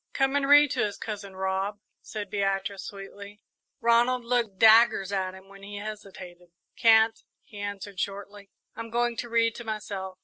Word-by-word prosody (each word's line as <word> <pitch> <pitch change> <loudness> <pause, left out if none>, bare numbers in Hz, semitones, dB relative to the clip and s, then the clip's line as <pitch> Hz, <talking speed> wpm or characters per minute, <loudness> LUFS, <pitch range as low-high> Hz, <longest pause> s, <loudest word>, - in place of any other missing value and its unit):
"Come 270 0 +1
and 280 -1 +1
read 290 -1 +7
to - - +1
us, 205 - -8
Cousin 205 -3 -7
Rob," 190 +2 -2 0.2
said 205 -2 -7
Beatrice, 195 -1 -2
sweetly. 200 +1 -10 0.4
Ronald 235 +1 +3
looked 235 -5 0
daggers 220 -2 +5
at 190 -1 -2
him 190 0 -15
when 195 0 -15
he 205 +1 -8
hesitated. 190 -4 -9 0.3
"Can't," 225 0 +4 0.2
he 210 - -13
answered 205 -1 -6
shortly; 200 0 -6 0.3
"I'm 230 0 -7
going 240 +1 0
to 240 - -5
read 230 0 +2
to 235 - -7
myself." 200 -4 -5
205 Hz, 165 wpm, -27 LUFS, 195-230 Hz, 0.4 s, read